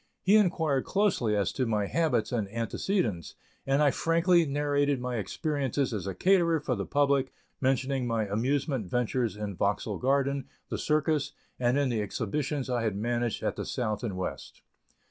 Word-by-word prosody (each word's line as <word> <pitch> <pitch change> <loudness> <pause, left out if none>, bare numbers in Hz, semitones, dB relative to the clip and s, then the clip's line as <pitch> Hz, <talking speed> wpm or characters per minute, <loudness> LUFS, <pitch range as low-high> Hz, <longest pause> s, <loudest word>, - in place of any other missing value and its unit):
He 195 +3 +5
inquired 160 -9 +2
closely 185 - +1
as 100 -1 +1
to 130 -3 -1
my 105 -2 +1
habits 155 -3 0
and 110 -5 -1
antecedents, 115 - -2 0.3
and 135 +2 +3
I 145 - +5
frankly 170 +1 +3
narrated 145 -1 +1
my 125 -1 -3
experiences 140 - -1
as 100 -3 -3
a 95 - -3
caterer 170 - +3
for 145 -3 -2
the 100 -5 -3
public, 140 -2 +2 0.3
mentioning 130 0 +1
my 115 -2 0
amusement 130 - -1
ventures 120 +1 0
in 105 -2 -4
Vauxhall 100 +2 -1
Garden, 140 +1 +1 0.2
the - - -3
circus, 155 -1 +1 0.3
and 125 +1 +2
in 140 -2 +2
the 115 -3 0
exhibitions 135 +7 -2
I 125 -2 0
had 110 -3 -1
managed 120 +2 -1
at - - -1
the - - -2
South 110 -2 -2
and 100 -6 -3
West. 95 - -6
130 Hz, 165 wpm, -29 LUFS, 110-145 Hz, 0.3 s, He